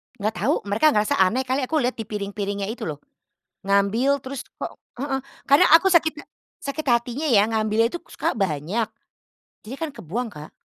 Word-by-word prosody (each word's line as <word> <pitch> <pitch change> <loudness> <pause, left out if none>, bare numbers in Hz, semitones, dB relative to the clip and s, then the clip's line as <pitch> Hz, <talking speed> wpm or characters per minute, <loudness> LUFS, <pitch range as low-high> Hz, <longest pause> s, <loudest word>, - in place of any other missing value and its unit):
Nggak 215 +1 -2
tau, - - +2
mereka 205 +9 +2
ngerasa 210 0 +2
aneh 195 +8 +3
kali 260 0 -1
aku 320 - -2
lihat 250 +1 0
di 225 - -3
piring-piringnya 200 -1 -3
itu 230 - -5
loh. 150 -2 -5 0.6
Ngambil, 200 +8 +2
terus 260 -1 -5 0.2
kok - - -5 0.2
heeh, 270 0 -1 0.3
karena 280 +1 +6
aku 385 +3 0
sakit 320 -2 +4 0.5
sakit 280 +3 -4
hatinya 240 +5 +1
ya, 210 -3 +5
ngambil 220 0 +2
itu 345 - -5
suka - - -1
banyak, 195 - -1 0.7
jadinya 260 +6 -9
kan 320 - -2
kebuang, 225 +9 -4
Kak. 150 0 -10
225 Hz, 170 wpm, -23 LUFS, 200-265 Hz, 0.7 s, karena